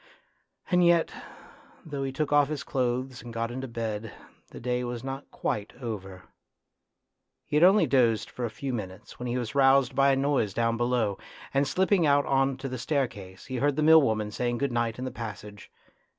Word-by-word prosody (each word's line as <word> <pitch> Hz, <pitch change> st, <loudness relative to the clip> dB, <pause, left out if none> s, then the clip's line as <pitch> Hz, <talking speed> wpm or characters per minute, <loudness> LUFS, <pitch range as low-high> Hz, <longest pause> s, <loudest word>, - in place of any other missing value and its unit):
And 180 Hz, 0 st, +4 dB
yet 170 Hz, -1 st, +4 dB, 0.7 s
though 145 Hz, -3 st, -5 dB
he 135 Hz, -1 st, -2 dB
took 145 Hz, +2 st, -2 dB
off 145 Hz, -1 st, +5 dB
his 150 Hz, 0 st, -4 dB
clothes 130 Hz, 0 st, -2 dB
and 120 Hz, -, -9 dB
got 115 Hz, 0 st, -3 dB
into 130 Hz, +2 st, -5 dB
bed, 115 Hz, -2 st, -4 dB, 0.4 s
the -, -, -11 dB
day 125 Hz, +1 st, -1 dB
was 120 Hz, -1 st, -5 dB
not 135 Hz, +1 st, -6 dB
quite 105 Hz, -1 st, -3 dB
over. 95 Hz, -6 st, -6 dB, 1.2 s
He -, -, -4 dB
had 150 Hz, -, +4 dB
only 190 Hz, +4 st, +6 dB
dozed 120 Hz, -5 st, +2 dB
for 125 Hz, -, -7 dB
a 120 Hz, -, -1 dB
few 130 Hz, +5 st, -5 dB
minutes 95 Hz, -5 st, -7 dB
when 125 Hz, -, -4 dB
he 120 Hz, +1 st, -1 dB
was 120 Hz, -1 st, -4 dB
roused 135 Hz, -2 st, +4 dB
by 140 Hz, 0 st, +4 dB
a -, -, +3 dB
noise 135 Hz, -7 st, 0 dB
down 115 Hz, 0 st, +1 dB
below, 120 Hz, -4 st, 0 dB, 0.3 s
and 140 Hz, +1 st, +2 dB
slip 185 Hz, +8 st, +1 dB
ping 180 Hz, -6 st, +4 dB
out 145 Hz, 0 st, +4 dB
on 135 Hz, 0 st, +1 dB
to 135 Hz, 0 st, -5 dB
the 130 Hz, -1 st, -5 dB
staircase 115 Hz, -, -3 dB
he 130 Hz, -2 st, -4 dB
heard 145 Hz, +2 st, +1 dB
the 155 Hz, -, 0 dB
mill 160 Hz, +1 st, +8 dB
worn 110 Hz, -5 st, +1 dB
an 105 Hz, 0 st, -5 dB
saying 120 Hz, +2 st, -1 dB
good 140 Hz, +1 st, -1 dB
night 120 Hz, -2 st, -1 dB
in 130 Hz, -, -4 dB
the 130 Hz, -, -4 dB
passage. 105 Hz, -2 st, -8 dB
125 Hz, 205 wpm, -27 LUFS, 115-140 Hz, 1.2 s, mill